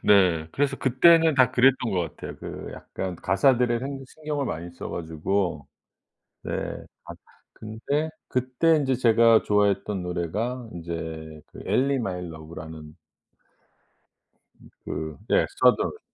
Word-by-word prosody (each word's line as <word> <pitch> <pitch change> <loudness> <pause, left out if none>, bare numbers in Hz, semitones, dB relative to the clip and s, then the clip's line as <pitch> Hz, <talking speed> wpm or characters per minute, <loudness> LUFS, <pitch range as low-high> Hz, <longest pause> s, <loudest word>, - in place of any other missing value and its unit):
네. 90 -6 +4
그래서 140 -1 0
그때는 160 +5 +5
다 130 -3 +5
그랬던 125 -2 +3
것 95 -3 +1 0.2
같아요. - - -8
그 - - -8
약간 95 -2 -6
가사들에 120 +7 +2
행 135 +1 -5
신경을 150 -1 -4
많이 85 -2 -5
써 85 - -7
가지고. 80 -1 -2 0.8
네. - - -5 0.5
아 - - -8 0.4
근데 140 +9 -3 0.2
그때 130 +6 +2
인제 135 -4 +1
제가 115 -2 +5
좋아했던 105 -1 +1
노래가 105 +8 -3
인제 80 -2 -6
그 - - -11
Ellie 140 +2 +2
My 90 -6 -3
Love라는 80 -1 -9 1.6
음 - - -18 0.2
그 80 -2 -5
예 - - +4 0.2
Southern. - - +3
105 Hz, 285 characters per minute, -25 LUFS, 85-130 Hz, 1.6 s, 그때는